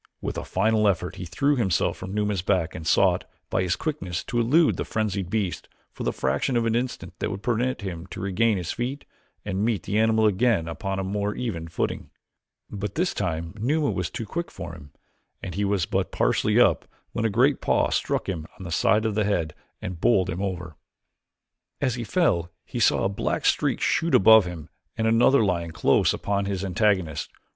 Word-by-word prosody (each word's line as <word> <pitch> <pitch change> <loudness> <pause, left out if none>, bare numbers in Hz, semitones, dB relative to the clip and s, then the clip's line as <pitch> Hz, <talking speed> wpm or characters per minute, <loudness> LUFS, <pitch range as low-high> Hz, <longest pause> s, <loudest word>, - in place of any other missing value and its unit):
With - - -4
a - - -4
final 110 +2 +2
effort 95 -1 -1
he 90 - -5
threw 140 - +1
himself 100 -8 +1
from 95 - -7
Numa's 105 -2 0
back 90 -3 0
and 80 - -6
sought, - - +3 0.3
by - - +1
his 90 -2 +1
quickness, 95 - -3
to 120 - -2
elude 150 +8 +3
the - - -1
frenzied 100 -4 -2
beast 100 -3 -2 0.2
for - - -11
the - - +1
fraction 70 - 0
of 115 - +1
an 115 - +1
instant 125 +2 -3
that - - -1
would 100 +1 -6
permit 125 +2 0
him 90 -3 -6
to - - -8
regain 100 +3 +1
his 90 -2 -3
feet 130 +4 -4 0.4
and 100 -1 -1
meet 110 -6 0
the 105 +2 0
animal 110 0 +3
again 105 -4 +2
upon 95 +3 -3
a 95 - -1
more 100 +2 -2
even 90 -10 -4
footing. 80 - -3 0.6
But 100 -1 -5
this 180 +2 0
time 85 -3 -3
Numa 145 +6 +1
was - - -2
too 115 - -5
quick 170 +11 -4
for 75 - -8
him 75 -4 -12 0.5
and 90 - -6
he 100 +4 -1
was 100 -3 +1
but - - -1
partially - - +2
up - - +3 0.2
when 115 - -2
a 115 - +2
great 100 - +2
paw - - +2
struck - - -1
him 80 -4 -4
on - - -9
the 85 - -6
side 100 +7 +2
of 110 - 0
the 105 +1 +1
head 85 -7 0 0.3
and 90 -2 -5
bowled 95 -5 +3
him 90 +2 -4
over. 90 -5 -4 1.0
As 130 - +1
he 120 0 -4
fell 105 - +1 0.2
he - - -5
saw - - +3
a - - +3
black 100 - -2
streak - - +2
shoot 165 +1 +2
above 110 +1 +7
him 85 -3 -7 0.3
and 110 - 0
another 115 +2 +4
lion 85 -3 -1
close 80 - +3
upon 100 0 -1
his 100 -1 -2
antagonist. 95 -5 0
100 Hz, 200 wpm, -25 LUFS, 90-115 Hz, 1.0 s, above